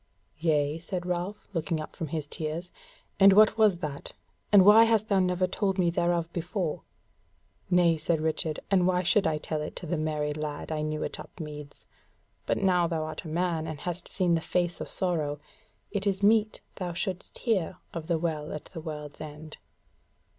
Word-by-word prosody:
"Yea," 155 -1 +1
said 175 +1 -4
Ralph, 180 +3 -3
looking 165 -1 -1
up 155 - -7
from 165 - -4
his 155 0 -3
tears, 160 +4 -5 0.5
"and 195 0 +8
what 215 +1 +6
was 215 -5 +4
that? 145 -3 -5 0.4
and 200 -3 +8
why 220 +2 +9
hast 225 -1 +2
thou 200 -2 +4
never 180 0 +2
told 190 +1 -1
me 175 -2 +3
thereof 170 -1 +1
before?" 175 -1 -2 0.9
"Nay," 175 -2 +4
said 160 +1 0
Richard, 155 0 -1
"and 185 -2 +4
why 180 0 +2
should 185 +2 +3
I 155 -1 +1
tell 155 0 -3
it 150 - -5
to - - -6
the 170 0 -1
merry 150 -1 -1
lad 150 0 -5
I 155 -1 -1
knew 155 0 -2
in - - -3
Upmeads? 150 -3 -9 0.6
but - - +1
now 180 -3 +3
thou 165 -2 -1
art 155 +2 -6
a - - -5
man, 165 0 -1
and 155 -2 -5
hast 175 0 -4
seen 180 -3 +1
the 165 - +2
face 175 +1 -1
of - - -5
sorrow, 155 -6 -1 0.5
it 205 0 -1
is 195 0 0
meet 215 +1 +4 0.2
that 190 - -4
thou 175 - -4
shouldest 185 +1 -4
hear 190 -7 0 0.2
of 165 -2 -5
THE 170 -2 +2
WELL 155 -2 -2
AT 150 - -6
THE 165 - -8
WORLD'S 150 -2 -7
END." 155 0 -9
170 Hz, 190 wpm, -28 LUFS, 155-185 Hz, 0.9 s, why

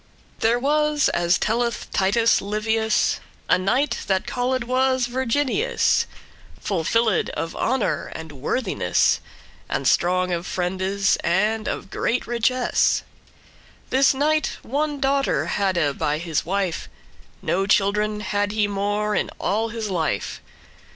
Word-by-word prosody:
There 230 +2 +3
was, 300 +2 +2
as 175 0 +2
telleth 235 +1 -1
Titus 215 +4 +3
Livius, 220 +2 0 0.3
<1> - - +4
A - - -5
knight, 245 +6 +1
that 190 -1 +1
called 250 0 -1
was 260 +1 +1
Virginius, 260 - +1 0.5
Full 185 -5 -2
filled 225 +2 +2
of 165 - -3
honour 255 -1 -1
and 160 -1 -7
worthiness, 145 - +1 0.5
And - - -1
strong 185 +1 +2
of 170 +1 -3
friendes, 190 +2 0
and 215 +5 +1
of - - -4
great 245 - -1
richess. 240 +1 +1 0.9
This 270 +1 +4
knight 305 +2 +1
one 290 +3 -2
daughter 275 0 +1
hadde 175 -8 0
by 150 -1 0
his 165 -1 -2
wife; 190 -2 -2 0.5
No 195 +2 0
children 210 +1 +2
had 205 0 -1
he 215 -1 +2
more 205 +1 -1
in - - 0
all 220 +4 0
his 220 -2 -4
life. 155 - -2
215 Hz, 125 wpm, -23 LUFS, 190-250 Hz, 0.9 s, <1>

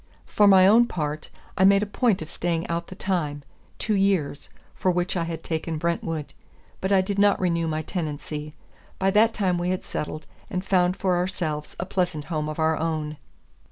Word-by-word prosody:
For 210 - +3
my 190 -2 +7
own 230 +5 +6
part, 150 -4 -4 0.3
I 190 - +2
made 200 +1 +6
a - - 0
point 205 -3 +1
of 155 - -11
staying 170 -1 -1
out 170 0 -2
the 185 - -9
time 155 -7 -2 0.3
two 215 - -1
years 195 -8 0 0.2
for 185 - 0
which 180 +1 0
I 170 -2 0
had 165 -1 -5
taken 160 0 -3
Brentwood; 165 -2 -2 0.5
but 190 - -2
I 195 -1 +5
did 200 +1 -2
not 205 -1 +4
renew 170 -3 0
my 155 0 -2
tenancy. 150 -3 -5 0.4
By 195 0 +2
that 220 +3 +5
time 185 -5 0
we 175 +1 -1
had 185 0 -1
settled, 155 +1 -5 0.2
and 185 -2 -3
found 185 -1 +2
for 185 -2 +1
ourselves 175 -5 -3
a 175 - -2
pleasant 180 -5 -1
home 155 -1 -1
of 155 - -5
our 160 0 +2
own. 155 -2 -2
175 Hz, 190 wpm, -25 LUFS, 155-190 Hz, 0.5 s, my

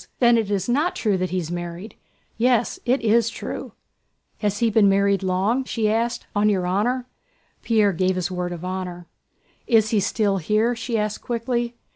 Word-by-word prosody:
"Then 240 -1 +5
it 225 -3 0
is 200 -3 -1
not 295 +9 +1
true 210 -4 +1
that 185 0 -1
he's 175 -2 -3
married!" 175 +4 -6 0.4
"Yes, 240 0 +1
it 255 +2 +2
is 230 0 +3
true." - - -6 0.7
"Has 205 -1 -1
he 230 +1 +1
been 210 -2 +5
married 200 0 +2
long?" 195 +7 +1
she 225 -4 -1
asked. 235 +2 -1
"On 210 +1 +3
your 190 -3 +1
honor?..." 230 +8 0 0.6
Pierre 215 -4 +2
gave 185 +2 +1
his 185 0 -2
word 180 -1 -3
of 175 0 -6
honor. 180 -1 -5 0.6
"Is 220 -2 +3
he 215 - +3
still 200 0 +1
here?" 215 +7 +1
she 230 0 -2
asked, 210 0 -2
quickly. 235 0 -2
210 Hz, 175 wpm, -23 LUFS, 185-235 Hz, 0.7 s, Then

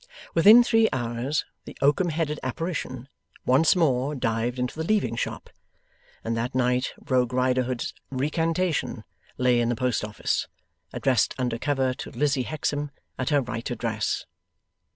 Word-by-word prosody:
Within 215 +8 +8
three 225 -2 +3
hours 120 +3 -1 0.2
the - - -10
oakum 150 +6 +3
headed 155 -2 -1
apparition 130 -3 -4 0.4
once 140 +8 +4
more 145 -4 +1
dived 115 0 -1
into 125 0 -2
the 160 - -3
Leaving 180 - +1
Shop, - - -4 0.8
and 115 0 -1
that 120 +3 -2
night 125 0 +1 0.2
Rogue 125 -2 +2
Riderhood's 130 -1 0 0.2
recantation 160 +5 -1 0.3
lay 125 -1 +3
in 120 0 +1
the 120 - +1
post 125 -1 0
office, 105 0 -1 0.4
addressed 130 -3 +1
under 125 -3 -1
cover 135 -2 +1
to - - -7
Lizzie 135 0 0
Hexam 145 -1 -2 0.3
at 130 - 0
her 145 -2 +3
right 115 -2 -4
address. - - -2
130 Hz, 140 wpm, -26 LUFS, 125-150 Hz, 0.8 s, Within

